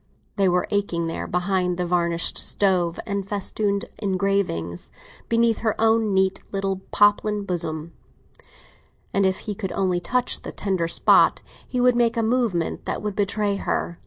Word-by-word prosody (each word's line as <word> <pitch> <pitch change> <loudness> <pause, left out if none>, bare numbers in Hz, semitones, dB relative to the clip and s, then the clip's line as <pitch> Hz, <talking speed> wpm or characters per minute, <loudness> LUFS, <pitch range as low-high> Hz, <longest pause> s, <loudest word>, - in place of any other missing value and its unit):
They 195 -2 +3
were 180 0 +1
aching 200 -5 0
there, 165 - -4
behind 180 0 0
the 180 - -1
varnished 170 -1 +1
stove, 180 -4 +1
the 200 -1 -2
festooned 200 +1 -1
engravings, 190 - -1 0.4
beneath 230 -1 +2
her 220 -2 -1
own 225 -1 +3
neat 190 0 +1
little 195 -1 -2
poplin 205 0 +3
bosom; 165 -3 -3 1.2
and 195 -1 +3
if 190 - -1
he 210 - -4
could 190 -2 -5
only 185 -2 +1
touch 250 +7 0
the - - -7
tender 190 -4 -1
spot, - - +4 0.3
she 250 - -1
would 250 0 +4
make 235 -1 +2
a 230 - +2
movement 220 -8 0
that - - -3
would 210 -2 -3
betray 205 0 0
her. 170 -3 -2
195 Hz, 155 wpm, -23 LUFS, 180-210 Hz, 1.2 s, spot